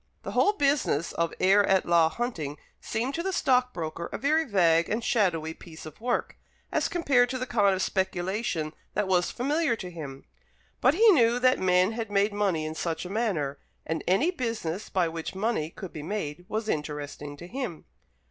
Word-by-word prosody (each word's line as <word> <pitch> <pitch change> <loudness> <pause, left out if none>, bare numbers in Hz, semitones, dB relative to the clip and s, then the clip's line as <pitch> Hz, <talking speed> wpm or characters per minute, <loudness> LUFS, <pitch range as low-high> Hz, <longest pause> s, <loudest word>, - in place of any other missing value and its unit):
The - - -5
whole 415 - +3
business 280 - +1
of 170 0 -1
heir 195 +2 +5
at 190 -1 +2
law 170 -2 +4
hunting 160 - -4 0.2
seemed 240 +5 -2
to 335 - -2
the 385 +2 -1
stockbroker 250 - 0
a - - -3
very 310 +4 +2
vague 170 - +3
and 225 +2 -1
shadowy 175 - +1
piece 160 -1 -12
of 155 +6 -11
work, 245 +1 -1 0.3
as - - +1
compared 270 -8 +2
to 255 - -2
the 255 - -3
kind 205 -6 +3
of 185 - -1
speculation 190 -3 -1 0.2
that 210 -1 +1
was 180 -2 +2
familiar 290 +1 0
to 180 -5 -7
him; 140 -5 -8 0.6
but 270 - +4
he 450 +5 +5
knew 240 -8 +4
that 255 +1 +3
men 185 +1 +3
had 225 -1 -4
made 205 +1 +2
money 195 -7 0
in 155 - -4
such 165 +1 -3
a - - -6
manner, 175 -11 -1 0.3
and 160 -1 -2
any 250 - +3
business 225 - -3
by 180 -3 +1
which 165 +2 -5
money 195 -6 -1
could 190 +1 -9
be 155 - -6
made, 170 -2 -4
was 220 0 -2
interesting 150 -2 -4
to 170 - -9
him. 220 - -5
190 Hz, 185 wpm, -27 LUFS, 165-240 Hz, 0.6 s, heir